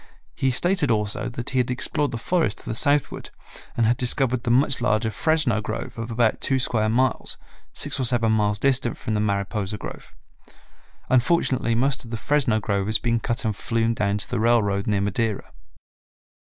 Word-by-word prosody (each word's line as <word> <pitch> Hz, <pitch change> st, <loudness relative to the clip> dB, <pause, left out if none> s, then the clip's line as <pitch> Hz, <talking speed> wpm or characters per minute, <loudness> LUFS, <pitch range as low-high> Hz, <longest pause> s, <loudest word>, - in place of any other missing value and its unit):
He 130 Hz, -, 0 dB
stated 170 Hz, +3 st, +2 dB
also 105 Hz, +1 st, 0 dB
that 120 Hz, 0 st, -5 dB
he 130 Hz, -, +1 dB
had 125 Hz, -, 0 dB
explored 135 Hz, +3 st, 0 dB
the 115 Hz, -, -4 dB
forest 160 Hz, -, 0 dB
to -, -, -13 dB
the -, -, -3 dB
southward 145 Hz, +5 st, +1 dB, 0.5 s
and 115 Hz, -, +3 dB
had 120 Hz, +2 st, +2 dB
discovered 125 Hz, 0 st, +1 dB
the 120 Hz, -, -3 dB
much 130 Hz, +1 st, +2 dB
larger 110 Hz, -2 st, +1 dB
Fresno 145 Hz, -3 st, +1 dB
grove 110 Hz, +1 st, -5 dB
of 115 Hz, +1 st, -5 dB
about 115 Hz, -1 st, +1 dB
two 135 Hz, -, +1 dB
square 110 Hz, -4 st, 0 dB
miles, 130 Hz, +4 st, +1 dB, 0.3 s
six -, -, -2 dB
or -, -, 0 dB
seven 115 Hz, -2 st, +2 dB
miles 105 Hz, -1 st, +1 dB
distant 130 Hz, -1 st, +1 dB
from 110 Hz, -, -4 dB
the 105 Hz, -, 0 dB
Mariposa 100 Hz, 0 st, -2 dB
grove. -, -, -10 dB, 0.9 s
Unfortunately 130 Hz, -3 st, +2 dB
most 135 Hz, +3 st, 0 dB
of 120 Hz, -, -12 dB
the 115 Hz, -, -4 dB
Fresno 125 Hz, -3 st, +1 dB
grove 100 Hz, -2 st, -1 dB
has 110 Hz, 0 st, +2 dB
been 115 Hz, -1 st, 0 dB
cut 120 Hz, +3 st, -3 dB
and 110 Hz, -2 st, 0 dB
flumed 115 Hz, +1 st, -1 dB
down 100 Hz, -1 st, 0 dB
to 105 Hz, -, -3 dB
the 125 Hz, -, -2 dB
railroad 110 Hz, -4 st, +2 dB
near 105 Hz, -2 st, +1 dB
Madera. 105 Hz, +2 st, -2 dB
115 Hz, 185 wpm, -23 LUFS, 110-130 Hz, 0.9 s, and